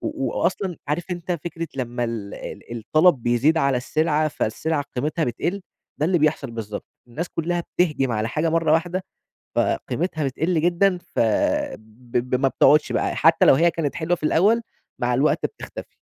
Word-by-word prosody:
و 305 -4 -2
وأصلًا 180 0 -1
عارف 155 +4 -1
أنت 175 0 -3
فكرة 165 0 -4
لمّا 120 -2 -2
ال 115 -4 -4
ال 120 - -7
الطلب 155 +4 +3
بيزيد 120 +8 +3
على 140 -3 +2
السلعة، 155 +4 +1
فالسلعة 150 +4 -2
قيمتها 155 +5 0
بتقل؟ 175 +11 -2 0.4
ده 150 - +1
اللي 180 0 +2
بيحصل 150 -4 +1
بالضبط، 110 -3 -6 0.2
الناس 160 +9 -4
كلّها 175 +1 -1 0.2
بتهجم 150 -8 +2
على 110 +1 -1
حاجة 155 +6 0
مَرّة 165 -1 +2
واحدة 175 +3 0 0.5
فقيمتها 160 -2 -1
بتقل 155 +5 0
جدًا، 180 +2 +3 0.2
فب 110 +1 -1 0.2
ب 125 - +2
ما 135 - +4
بتقعدش 150 +3 +4
بقى - - 0
حتّى 165 +1 +4
لو - - +8
هي 170 +4 +4
كانت 155 -4 -2
حلوة 170 +2 0
في 165 - -15
الأول، 205 +9 +3 0.4
مع - - +1
الوقت - - +2
بتختفي. - - -8
155 Hz, 165 wpm, -23 LUFS, 125-175 Hz, 0.5 s, لو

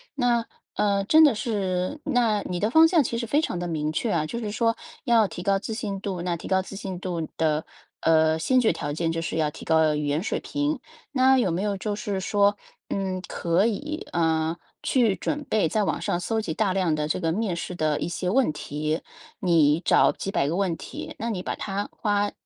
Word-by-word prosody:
那， 240 -4 +2 0.3
呃， 200 -1 +2
真 315 +9 +7
的 290 -5 +6
是 195 +2 -2
那 240 -8 +2
你 180 -1 -3
的 210 - +1
方 320 +6 +7
向 330 -3 +4
其 230 -1 -2
实 235 - -2
非 285 +7 +2
常 240 - -2
地 175 0 -3
明 155 -2 -1
确 220 +7 -1
啊， 160 -4 +1
就 235 +9 -4
是 215 -3 -4
说 230 +1 +1 0.3
要 230 -4 +4
提 175 - -7
高 195 +1 +2
自 215 +3 -5
信 210 -3 -3
度， 190 -4 -3
那 175 0 -1
提 170 - -8
高 190 0 +3
自 190 - -9
信 190 -2 -5
度 175 -4 -3
的， 155 -1 +1 0.4
呃， 160 0 +4
先 255 +10 +2
决 235 - +3
条 145 - -4
件 165 +2 -1
就 165 0 -2
是 165 - -3
要 155 -1 +2
提 150 - -11
高 160 -1 +3
语 150 0 -2
言 145 +2 0
水 210 - -2
平。 290 0 -1 0.3
那 265 -1 +4
有 230 - +2
没 170 +2 -1
有 205 -1 -1
就 205 +2 -3
是 205 -2 -3
说， 205 +1 +2 0.3
嗯， 190 -1 -2
可 175 +4 +1
以， 290 +8 -3
啊， 160 0 +1 0.3
去 235 -7 +3
准 295 +7 -3
备 215 -9 +2
在 215 +5 +1
网 - - -1
上 175 - -1
搜 220 +5 -1
集 170 -7 -3
大 200 -2 +1
量 185 -4 +1
的 150 0 -1
这 155 - -1
个 165 -2 0
面 205 -1 -1
试 175 +1 -5
的 155 -3 0
一 - - -2
些 180 +1 -2
问 250 -1 +3
题， 150 +1 -3 0.4
你 165 -6 +4
找 - - +4
几 195 - -5
百 140 - +1
个 160 - -1
问 185 -3 0
题， - - -8
那 230 - -2
你 195 -5 -2
把 - - -3
它 200 0 -3
花， 205 -1 0
195 Hz, 245 characters per minute, -25 LUFS, 165-225 Hz, 0.4 s, 真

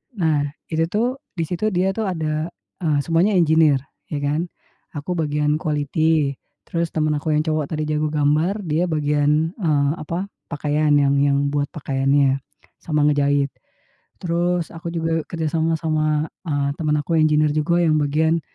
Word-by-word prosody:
Nah, 155 -6 +1 0.2
itu 160 +1 +1
tuh 215 +6 0 0.3
di 165 - -1
situ 180 +6 -2
dia 185 +2 +2
tuh 220 0 -2
ada, 155 -3 -2 0.3
eee, 155 -5 +1
semuanya 175 +5 +2
engineer, 160 -5 +4 0.3
ya 145 -2 -4
kan. 150 +5 0 0.5
Aku 145 +5 -4
bagian 150 -1 0
quality, 155 -1 +1 0.3
terus 170 -1 -2
teman 155 -1 +1
aku 155 0 0
yang 150 - +2
cowok 155 -3 -1
tadi 155 - -2
jago 150 0 0
gambar 155 +7 +1
dia 165 +2 0
bagian, 150 +1 +1
eee, 145 -5 +2
apa 175 +6 -4 0.2
pakaian 150 +1 +1
yang 140 -1 +3
yang 140 0 +2
buat 145 -1 0
pakaiannya 135 -1 +2 0.4
sama 150 -2 0
ngejahit. 145 -1 +1 0.7
Terus 175 -1 -1
aku 165 +1 -6
juga 165 -1 -1
kerja 165 -2 -3
sama 160 0 +1
sama, 155 -1 0 0.2
eee, 145 -4 -1
teman 150 -1 0
aku 150 +3 -2
engineer, 150 -1 +3
juga 165 +3 +1
yang 155 -1 +3
bagian 160 +3 +1
155 Hz, 155 wpm, -21 LUFS, 145-165 Hz, 0.7 s, engineer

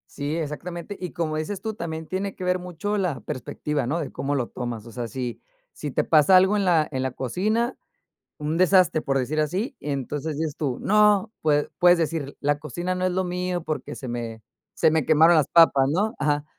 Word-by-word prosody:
Sí, 145 +2 -2
exactamente, 170 +5 -5
y 180 -2 -5
como 155 -2 -2
dices 180 +6 -4
tú, 220 -1 -3
también 160 -5 -5
tiene 195 +2 -3
que - - -7
ver 180 0 +1
mucho 180 +4 -3
la 180 -8 -1
perspectiva, 135 +1 -3
¿no? 155 - 0
De 145 - -5
cómo 145 +1 -2
lo 125 -3 -1
tomas, 120 -3 -5
o 115 - -11
sea, 120 -1 -4
si 125 -1 -5 0.3
si 150 - -6
te - - 0
pasa 155 +3 +5
algo 190 +3 +5
en 200 - 0
la 165 -4 +4
en 130 - -2
la 130 - -1
cocina, 215 - -1 0.6
un 150 +1 -2
desastre, 185 -3 +4
por 135 -2 0
decir 140 +4 -1
así, 185 - -1
entonces 145 +1 -3
dices 155 -2 -2
tú: 135 -5 -2
"No", 210 0 +4
pue 150 -1 +1
puedes 175 0 +6
decir: 160 -4 -2
"La 145 0 +1
cocina 175 +5 -3
no 185 0 -1
es 185 - +1
lo 185 +1 0
mío, 180 -1 -2
porque 155 - -4
se 130 - -7
me 115 -2 -5 0.3
se 160 - +4
me 160 -3 +2
quemaron 160 +3 +5
las 150 -2 +3
papas, 140 -5 +5
¿no?". 205 +8 0
Ajá. 145 +1 0
160 Hz, 210 wpm, -24 LUFS, 145-180 Hz, 0.6 s, puedes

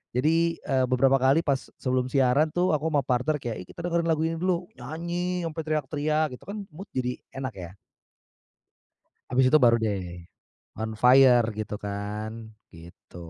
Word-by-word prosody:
Jadi, 165 +5 +2
eee, 130 -2 +1
beberapa 135 +2 +4
kali 135 +5 +4
pas 135 -3 -1
sebelum 130 -1 -1
siaran 135 +3 +3
tuh 175 +1 +1
aku 155 +2 -1
sama 145 -3 +2
partner 135 +4 0
kayak, 115 -5 -4
"Ih - - -43
kita 170 - -8
dengerin 170 -1 0
lagu 160 -1 +1
ini 165 0 -2
dulu!" 180 -1 0
nyanyi 170 +6 -3
sampai 160 0 -4
teriak-teriak 155 +1 0
gitu - - -21
kan 210 - -5 0.2
mood 195 +6 -9
jadi 125 -1 -1 0.2
enak 130 -1 -4
ya. 90 -1 -7 1.6
Habis 130 +1 +3
itu 155 - +7
baru 120 -2 +6
deh 95 -6 -3 0.6
on 110 0 -2
fire 125 0 +6
gitu 105 -1 -4
kan, 105 +2 -4 0.4
gitu. 85 +1 -15
135 Hz, 160 wpm, -26 LUFS, 120-160 Hz, 1.6 s, itu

